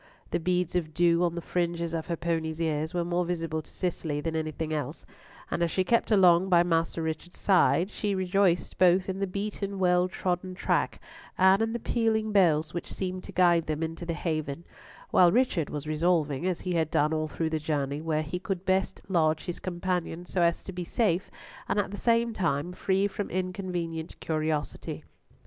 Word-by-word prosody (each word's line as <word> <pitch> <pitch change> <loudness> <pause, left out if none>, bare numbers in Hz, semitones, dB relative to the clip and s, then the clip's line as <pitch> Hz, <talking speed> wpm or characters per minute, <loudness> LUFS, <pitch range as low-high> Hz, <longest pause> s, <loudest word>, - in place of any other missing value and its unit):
The - - +1
beads 180 0 0
of 155 -3 -1
dew 170 0 +4
on 170 -1 0
the 170 - -4
fringes 170 -1 -1
of 160 -1 -3
her 170 - -1
pony's 160 -1 -2
ears 160 -1 -1
were 175 -1 -1
more 175 +1 0
visible 165 -2 -2
to 155 - -15
Cicely 165 -5 -2
than 160 +2 -3
anything 155 0 -2
else, 150 -1 -4 0.5
and - - -1
as 170 - +2
she 185 - +1
kept 235 +5 +2
along 185 -3 +5
by 175 -2 +6
Master 165 -1 0
Richard's 160 +2 -5
side, 190 0 +3
she 205 -2 -1
rejoiced 185 -1 +1
both 185 +1 +5
in 190 0 -3
the 195 - 0
beaten, 200 +1 -4
well 180 -1 +3
trodden 185 0 -2
track, - - 0 0.4
and 190 +2 +5
in 225 0 +1
the - - -1
pealing 220 -2 0
bells 165 -6 +3
which 175 - -5
seemed 185 -1 -4
to - - -8
guide 175 -2 +3
them 155 +1 -1
into 165 +1 -4
the 170 -1 -3
haven; 155 -1 -3 0.5
while 175 -2 +6
Richard 220 - +1
was 150 -1 -5
resolving, 155 -1 +1
as 180 -2 -1
he 180 - -2
had 160 -2 +1
done 150 +1 +2
all 155 0 0
through 160 +1 -2
the 160 - 0
journey, 145 -2 -2
where 155 -1 0
he 155 +4 -4
could 190 -2 -4
best 190 0 0
lodge 160 -4 +1
his 175 - -5
companion 175 -1 -3
so 180 - -1
as 170 0 +2
to - - -7
be 180 -1 -4
safe, 190 -1 0 0.4
and - - +1
at 205 -2 0
the - - -5
same 230 +1 +2
time 170 -3 -1
free 190 +2 +1
from 205 0 -3
inconvenient 180 -3 -3
curiosity. 155 -2 -2
175 Hz, 195 wpm, -28 LUFS, 160-185 Hz, 0.5 s, by